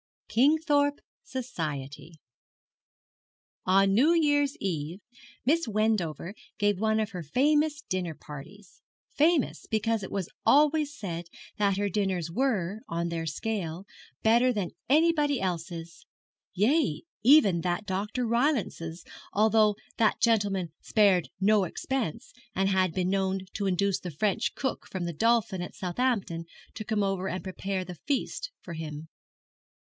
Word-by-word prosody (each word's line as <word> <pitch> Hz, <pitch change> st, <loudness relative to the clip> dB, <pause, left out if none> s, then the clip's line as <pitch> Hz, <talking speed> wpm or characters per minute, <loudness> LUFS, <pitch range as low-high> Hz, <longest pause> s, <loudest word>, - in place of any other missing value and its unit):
KINGTHORPE 285 Hz, +2 st, +3 dB, 0.2 s
SOCIETY. 165 Hz, -, -5 dB, 1.5 s
On 195 Hz, +1 st, +4 dB
New 280 Hz, +11 st, +5 dB
Year's 290 Hz, -2 st, +2 dB
Eve 170 Hz, -2 st, -3 dB, 0.5 s
Miss 325 Hz, +4 st, +2 dB
Wendover 200 Hz, -6 st, 0 dB, 0.2 s
gave 205 Hz, -2 st, +1 dB
one 220 Hz, 0 st, +2 dB
of 215 Hz, 0 st, -1 dB
her 180 Hz, -2 st, -5 dB
famous 295 Hz, -, +2 dB
dinner 180 Hz, -4 st, -2 dB
parties; 165 Hz, +9 st, -12 dB, 0.3 s
famous 310 Hz, -1 st, +2 dB
because 220 Hz, 0 st, +1 dB
it 190 Hz, -, -6 dB
was 195 Hz, -4 st, -2 dB, 0.2 s
always 300 Hz, +1 st, +4 dB
said 175 Hz, -4 st, -5 dB, 0.3 s
that 200 Hz, -2 st, +2 dB
her 205 Hz, 0 st, +1 dB
dinners 190 Hz, -4 st, -1 dB
were, 210 Hz, -4 st, 0 dB
on 170 Hz, 0 st, -1 dB
their 165 Hz, -1 st, -3 dB
scale, 180 Hz, 0 st, -3 dB, 0.4 s
better 235 Hz, +3 st, +5 dB
than 205 Hz, -7 st, -2 dB, 0.2 s
anybody 300 Hz, -2 st, +3 dB
else's 170 Hz, -2 st, -5 dB, 0.5 s
yea, 280 Hz, -, +2 dB, 0.2 s
even 215 Hz, -, +6 dB
that 180 Hz, +4 st, -1 dB
Dr. 205 Hz, +6 st, -2 dB
Rylance's, 235 Hz, -, 0 dB, 0.3 s
although 215 Hz, 0 st, +4 dB, 0.2 s
that 220 Hz, -2 st, +2 dB
gentleman 200 Hz, -7 st, +1 dB
spared 195 Hz, -6 st, +3 dB
no 205 Hz, +1 st, +4 dB
expense, 235 Hz, -, -3 dB, 0.2 s
and 195 Hz, 0 st, +2 dB
had 185 Hz, -2 st, +2 dB
been 185 Hz, +1 st, -1 dB
known 190 Hz, -1 st, 0 dB
to 200 Hz, -2 st, -1 dB
induce 195 Hz, +1 st, +1 dB
the 180 Hz, -, -6 dB
French 190 Hz, +6 st, -1 dB
cook 265 Hz, -, -3 dB
from 185 Hz, -2 st, -3 dB
the 170 Hz, -, -3 dB
Dolphin 225 Hz, 0 st, +2 dB
at 175 Hz, -, -7 dB
Southampton 185 Hz, -4 st, -1 dB, 0.3 s
to 215 Hz, -, -6 dB
come 215 Hz, -2 st, 0 dB
over 195 Hz, -1 st, -1 dB
and 185 Hz, -, -4 dB
prepare 190 Hz, 0 st, -3 dB
the 180 Hz, -2 st, -9 dB
feast 300 Hz, -, -2 dB
for 170 Hz, -, -7 dB
him. 155 Hz, -1 st, -6 dB
200 Hz, 130 wpm, -28 LUFS, 180-245 Hz, 1.5 s, even